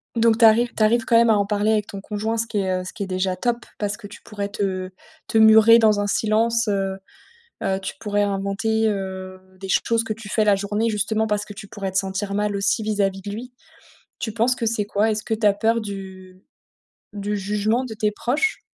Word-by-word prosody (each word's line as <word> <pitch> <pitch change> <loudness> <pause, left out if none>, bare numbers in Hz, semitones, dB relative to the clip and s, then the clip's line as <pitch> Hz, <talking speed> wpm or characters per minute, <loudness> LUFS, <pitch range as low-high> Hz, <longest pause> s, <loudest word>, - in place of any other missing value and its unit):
Donc 230 -1 +3
tu 230 - +7
arrives 230 +2 +5
tu 220 - +1
arrives 230 +2 +3
quand 230 - +4
même 235 0 +5
à 215 - +5
en 200 - +1
parler 210 +1 +1
avec 210 -1 0
ton 195 - -8
conjoint, 215 +3 -3
ce 230 - -1
qui 220 - -4
est, 185 -1 0
heu, - - -7
ce 185 - -8
qui - - -4
est - - -5
déjà 185 0 -1
top. 240 +4 -2
Parce 205 0 -2
que 210 - -10
tu 205 - -13
pourrais 205 -1 -5
te 190 -2 -3 0.4
te 225 - 0
murer 220 +1 +7
dans 215 -2 +4
un 205 - 0
silence, 225 +2 +1
heu 195 -2 -1 0.7
heu, 190 0 0
tu 190 - -5
pourrais 205 -2 0
inventer, 205 +3 0
heu, 190 -2 -4 0.2
des 195 - -7
choses 230 +3 +1
que 225 - -3
tu 220 -1 -11
fais 215 0 +1
la 205 -1 +5
journée 205 +3 -1
justement 220 +1 0
parce 210 -1 0
que 205 - -10
tu 200 0 -10
pourrais 195 -2 -5
te 190 - -1
sentir 195 +1 -2
mal 205 0 0
aussi 200 +3 0
vis-à-vis 200 -2 -1
de 200 - -6
lui. 240 +5 -7 0.7
Tu 220 - -4
penses 230 +3 +2
que 240 - -4
c'est 220 -2 0
quoi? 210 +2 +1
Est-ce 215 0 -2
que 225 - -1
tu 215 -1 0
as 205 - +6
peur 225 +3 +1
du 190 -3 -9 0.7
du 205 0 -3
jugement 210 +5 0
de 230 - -6
tes 210 -1 0
proches? 280 - -1
210 Hz, 235 wpm, -22 LUFS, 200-225 Hz, 0.7 s, tu